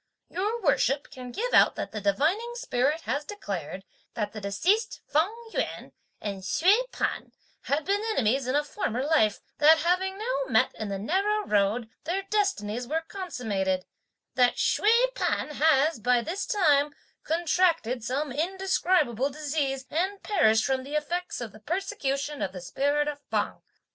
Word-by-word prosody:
Your 420 +5 -1
Worship 280 -2 +1
can 250 -1 -8
give - - -3
out - - +6
that - - -4
the 215 -1 -5
divining 320 - +1
spirit 305 - 0
has 285 0 -2
declared: 195 - -6 0.3
'that 210 -2 -2
the 215 - -7
deceased, 345 - 0
Feng 315 +7 +2 0.2
Yüan, - - -3 0.3
and 200 -2 -5
Hsüeh 400 - +3
P'an - - -2 0.3
had 290 +2 0
been 400 +1 +1
enemies 265 - +1
in 255 - 0
a 295 - +3
former 260 -3 -2
life, 290 -10 +2 0.2
that 310 +2 +7
having 375 +2 +1
now - - -1
met - - +3
in 215 -2 -5
the 195 - -2
narrow 400 - 0
road, 210 +3 +1 0.2
their 375 +4 -1
destinies 245 - 0
were 320 +4 -2
consummated; 205 - -2 0.5
that 245 -1 +3
Hsüeh 475 +4 +3
P'an - - -1
has, 305 -2 +3
by 245 +2 +3
this 360 +8 -3
time, 300 - +3 0.3
contracted 330 -7 +1
some 270 +4 -2
indescribable 340 - +1
disease 285 -2 -2
and 380 +5 -1
perished 220 - +3
from 265 -1 0
the 285 +3 -6
effects 345 +4 -2
of 235 -3 -5
the 215 - -14
persecution 295 - -2
of 190 - -2
the 180 - -7
spirit 285 +10 0
of 295 -1 -3
Feng.' - - -1
295 Hz, 155 wpm, -27 LUFS, 240-375 Hz, 0.5 s, that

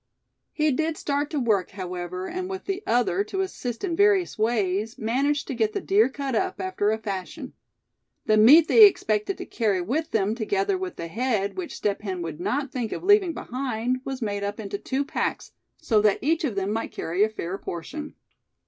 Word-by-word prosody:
He 305 -1 +1
did 315 +4 -1
start 290 0 -1
to 300 - -2
work, 210 -8 +1
however, 180 -1 -5
and 365 +1 -4
with 380 0 -6
the 390 0 -2
other 225 -6 +2
to 385 - -2
assist 245 -11 -4
in 350 -4 -1
various 400 -1 +3
ways, 215 -1 0
managed 275 +6 0
to - - -3
get 220 -3 0
the - - -1
deer 215 +5 +3
cut 275 -1 -4
up, 375 +7 -1
after 375 - 0
a 220 - +1
fashion. 195 -4 -6 0.7
The 215 - +4
meat 285 +10 +8
they 435 -2 +9
expected 220 - -1
to - - -6
carry 210 -5 0
with 275 - -2
them, 210 -1 +1
together 390 - 0
with 370 -1 -4
the 170 - -5
head, 210 0 -1
which 365 -3 -5
Step 205 -1 -1
Hen 185 -4 -4
would 160 -2 -6
not 275 +8 -1
think 240 -4 -3
of - - -5
leaving 385 -4 +4
behind, 255 -1 -2
was 270 -2 -4
made 205 -2 -2
up 205 +2 -3
into 200 -2 -5
two 270 +5 -2
packs, 290 - -3 0.3
so 215 -2 +2
that 210 -2 +3
each 325 +4 +1
of 255 -9 -1
them 195 +1 -1
might 225 +1 -2
carry 175 +5 0
a 215 - +2
fair 190 -4 -5
portion. 280 - -6
235 Hz, 200 wpm, -25 LUFS, 205-310 Hz, 0.7 s, they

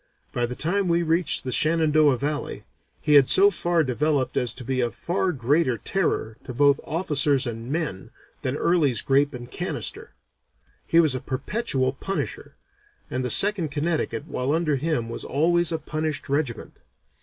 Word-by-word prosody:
By 120 -1 0
the 125 - -5
time 185 +7 0
we 170 0 +2
reached 165 +1 +1
the 130 - -4
Shenandoah 155 -1 +3
Valley, 145 +3 -4 0.4
he 150 - +1
had 140 -3 +6
so 200 +2 +6
far 170 -2 +1
developed 135 -1 0
as 125 - +1
to 125 - -8
be 130 +1 -1
a 120 - +1
far 175 - -2
greater 135 -1 +1
terror, 110 - -2
to 125 - -8
both 140 +1 +4
officers 145 -5 +1
and 115 +1 -5
men, 150 - -3 0.3
than 130 +1 -2
Early's 150 -9 +1
grape 140 +1 +2
and 120 0 -9
canister. - - -3 0.7
He 165 - +4
was 155 -5 +3
a 130 - -2
Perpetual 135 - -2
Punisher, 195 +8 -5 0.6
and 130 - -2
the 125 - -1
Second 195 - +4
Connecticut 155 0 -2
while 130 +3 -1
under 160 -3 +1
him 140 -4 -1
was 115 - -6
always 170 +4 +1
a 165 - 0
punished 155 -2 -4
regiment. 140 -4 -3
145 Hz, 165 wpm, -24 LUFS, 130-165 Hz, 0.7 s, had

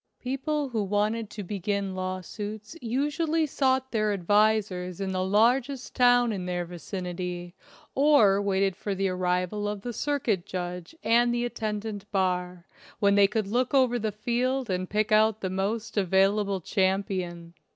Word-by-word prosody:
People 275 +3 -2
who 225 -3 -1
wanted 210 +2 0
to 210 - -7
begin 200 +1 -2
lawsuits 200 - -5
usually 295 +6 0
sought 260 -2 0
their 215 -2 +1
advisers 200 -2 +1
in 195 -1 -2
the 185 0 -1
largest 245 +7 +1
town 245 -1 +5
in 185 -3 -4
their 175 -1 -2
vicinity, 180 0 -5 0.4
or 265 -9 +5
waited 195 -1 +1 0.2
the 195 0 +1
arrival 180 +3 -1
of 205 -1 -4
the 240 +3 -5
circuit 245 -9 0
judge 180 - -5
and 235 +2 +4
the 240 0 0
attend 215 -3 -3
ant 205 -2 -6
bar, 180 -2 -1 0.3
when 200 -1 +4
they 200 0 +6
could 215 0 -1
look 245 +7 0
over 250 -2 +3
the 215 -1 -1
field 245 +3 -1
and 185 0 -2
pick 215 +1 0
out 215 0 +4
the 185 - -2
most 210 +4 -2
available 195 0 +2
champion. 185 -2 -1
205 Hz, 150 wpm, -27 LUFS, 185-240 Hz, 0.4 s, they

